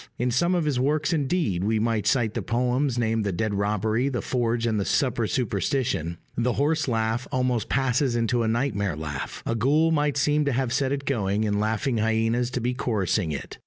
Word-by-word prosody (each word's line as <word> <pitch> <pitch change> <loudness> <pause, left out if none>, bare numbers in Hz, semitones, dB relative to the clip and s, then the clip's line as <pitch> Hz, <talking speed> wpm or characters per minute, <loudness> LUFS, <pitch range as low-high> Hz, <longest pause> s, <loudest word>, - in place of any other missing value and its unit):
In 125 +1 0
some 170 +9 +2
of 170 -3 0
his 140 -4 0
works 150 +5 +1
indeed 145 - 0
(we 110 +2 +1
might 110 -1 0
cite 120 -5 +2
the 120 - -2
poems 125 +4 0
named 115 -2 +1
The 100 - -1
Dead 105 +4 -1
Robbery, 105 +5 0
The 125 -3 -3
Forge, 120 -2 0
and 110 -2 +1
The - - 0
Supper 120 -2 +1
Superstition) 105 - -1 0.2
the 120 +1 +1
horse 150 +1 +1
laugh 115 0 -1
almost 125 -3 0
passes 130 -1 +1
into 120 +1 +1
a 115 - 0
nightmare 110 - 0
laugh. 75 -3 -5
A - - 0
ghoul 145 +8 +2
might 145 -2 +1
seem 150 +2 +2
to 140 - +1
have 125 -1 0
set 135 0 +1
it 140 0 -2
going, 105 -5 0
and 105 -1 0
laughing 110 +4 0
hyenas 115 +2 +1
to 125 - -1
be 125 +1 -1
chorusing 105 -7 0
it. 70 - -6
120 Hz, 200 wpm, -25 LUFS, 110-135 Hz, 0.2 s, some